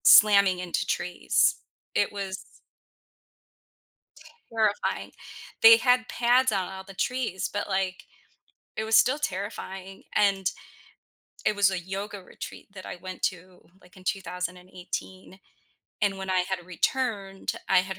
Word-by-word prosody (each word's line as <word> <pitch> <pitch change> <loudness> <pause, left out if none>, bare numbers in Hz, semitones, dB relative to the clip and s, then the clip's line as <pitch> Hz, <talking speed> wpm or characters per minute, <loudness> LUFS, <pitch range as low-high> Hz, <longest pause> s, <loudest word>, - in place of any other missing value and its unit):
slamming 200 -3 +7
into 180 -1 -1
trees. 180 0 +2 0.4
It - - +2
was 195 -2 -5 2.1
terrifying. 215 -2 0 0.5
They 225 0 +10
had 250 -1 +3
pads 245 +1 +3
on 195 -3 0
all 190 0 -7
the 195 0 -12
trees, 240 -2 -1
but 205 - -3
like, 190 -1 -1 0.7
it 220 - -1
was 220 0 +5
still 255 +7 +4
terrifying, 195 -4 -5
and 195 -2 +3 1.0
it 210 - +3
was 200 -1 +4
a 185 - -1
yoga 195 +3 -5
retreat 180 - -9
that 185 -2 -9
I - - -6
went 185 +1 -8
to, 185 -1 -3 0.2
like, 180 0 -20
in 185 - -14
2018, 180 0 -5 0.6
and 200 -2 +2
when 190 0 -5
I 185 - +3
had 180 -1 -3
returned, 195 +1 -1 0.2
I 190 - +6
had 190 0 -6
195 Hz, 130 wpm, -27 LUFS, 185-210 Hz, 2.1 s, They